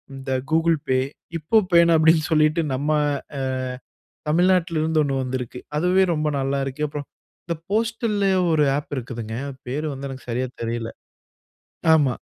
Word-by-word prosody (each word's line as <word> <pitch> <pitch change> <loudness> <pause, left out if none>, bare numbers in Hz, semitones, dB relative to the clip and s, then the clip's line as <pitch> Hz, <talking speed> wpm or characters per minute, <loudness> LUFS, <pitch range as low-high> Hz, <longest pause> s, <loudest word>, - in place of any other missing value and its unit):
இந்த 135 0 -6 0.2
Google 165 0 +3
Pay, 130 0 +3 0.4
இப்பபேன்னு 170 -2 +4
அப்படின்னு 160 0 +5
சொல்லிட்டு 155 +1 +3
நம்ம 145 +4 -1 0.5
அ - - -2 0.9
தமிழ்நாட்ல 175 0 +3
இருந்து 160 0 +2
ஒண்ணு 140 -2 -1
வந்திருக்கு. 125 -1 -4 0.2
அதுவே 180 +4 +3
ரொம்ப 155 -1 0
நல்லாருக்குப்ப. 140 +2 -2 0.5
இந்த 170 - -1 0.2
போஸ்டல்ல 220 -1 0 0.2
ஒரு 155 -2 +4
ஆப் 145 - -5
இருக்குதுங்க, 115 -3 -5
அது 135 - -8
பேர் 150 +5 -2
வந்து 135 +1 -6
எனக்கு 130 -1 -9
சரியா 125 +2 -1 0.2
தெரில. 115 0 -3 1.0
ஆமா. 140 -5 +3
150 Hz, 130 wpm, -23 LUFS, 130-170 Hz, 1.0 s, அப்படின்னு